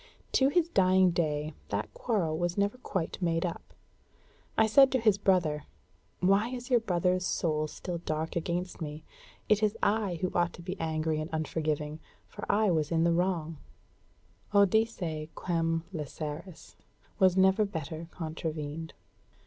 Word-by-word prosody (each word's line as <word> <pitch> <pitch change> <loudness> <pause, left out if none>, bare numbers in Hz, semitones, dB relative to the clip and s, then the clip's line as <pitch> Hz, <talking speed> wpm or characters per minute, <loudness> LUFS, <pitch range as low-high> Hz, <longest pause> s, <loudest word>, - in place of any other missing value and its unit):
To 265 0 +4
his 340 +2 +2
dying 185 - +4
day 155 -2 -1 0.2
that 100 +1 -3
quarrel 190 -10 0
was 175 +2 -1
never 205 +5 0
quite 190 -7 -3
made 165 -1 +1
up. 170 - -3 1.0
I 220 - +6
said 265 +5 +6
to 260 - +3
his 215 -3 +3
brother, 170 -7 +2 0.6
'Why 195 +5 +3
is 250 0 -6
your 245 - +6
brother's 180 -3 +1
soul 155 -4 0
still 175 +2 -5
dark 160 -1 -3
against 175 +2 -2
me? 150 0 -5 0.4
It 215 0 +3
is 215 -1 +1
I 205 -3 +2
who 185 - 0
ought 175 -1 +1
to 170 - -11
be 185 +2 -4
angry 155 -1 -1
and 155 - -5
unforgiving, 155 -1 -2 0.3
for 205 - -4
I 210 -1 +3
was 155 -2 0
in 165 -1 +2
the 170 0 +3
wrong.'" 165 -3 -1 1.0
Odisse 195 -6 +2
quem 165 -2 0
læseris 155 +2 -6 0.5
was 190 -2 +5
never 190 +3 +5
better 165 -4 -5
contravened. 160 -2 -5
170 Hz, 150 wpm, -30 LUFS, 160-195 Hz, 1.0 s, I